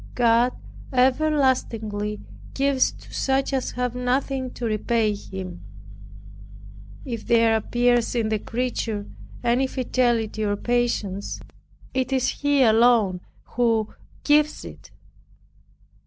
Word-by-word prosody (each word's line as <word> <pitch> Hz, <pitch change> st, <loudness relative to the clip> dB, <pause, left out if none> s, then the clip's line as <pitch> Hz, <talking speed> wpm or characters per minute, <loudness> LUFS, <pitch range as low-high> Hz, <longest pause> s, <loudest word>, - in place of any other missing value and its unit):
God 240 Hz, +1 st, +3 dB, 0.4 s
everlastingly 250 Hz, -6 st, +1 dB, 0.3 s
gives 275 Hz, -1 st, +2 dB
to -, -, -15 dB
such 270 Hz, +1 st, 0 dB
as 265 Hz, -1 st, -1 dB
have 250 Hz, -1 st, -2 dB
nothing 255 Hz, +1 st, -1 dB
to 240 Hz, -, -4 dB
repay 220 Hz, 0 st, +1 dB
Him. 190 Hz, -3 st, -8 dB, 1.4 s
If 235 Hz, -5 st, -6 dB
there 230 Hz, -1 st, +4 dB
appears 240 Hz, +2 st, +1 dB
in 225 Hz, -2 st, 0 dB
the 215 Hz, -1 st, 0 dB
creature 230 Hz, -3 st, -3 dB, 0.4 s
any 245 Hz, +3 st, +2 dB
fidelity 240 Hz, -4 st, 0 dB
or 205 Hz, -1 st, 0 dB
patience, 215 Hz, -4 st, -1 dB, 0.5 s
it 260 Hz, 0 st, -1 dB
is 260 Hz, -2 st, +1 dB
He 285 Hz, -2 st, +2 dB
alone 220 Hz, -5 st, +4 dB, 0.4 s
who 225 Hz, -3 st, +1 dB, 0.3 s
gives 300 Hz, +1 st, +2 dB
it. -, -, -11 dB
240 Hz, 105 wpm, -24 LUFS, 220-260 Hz, 1.4 s, there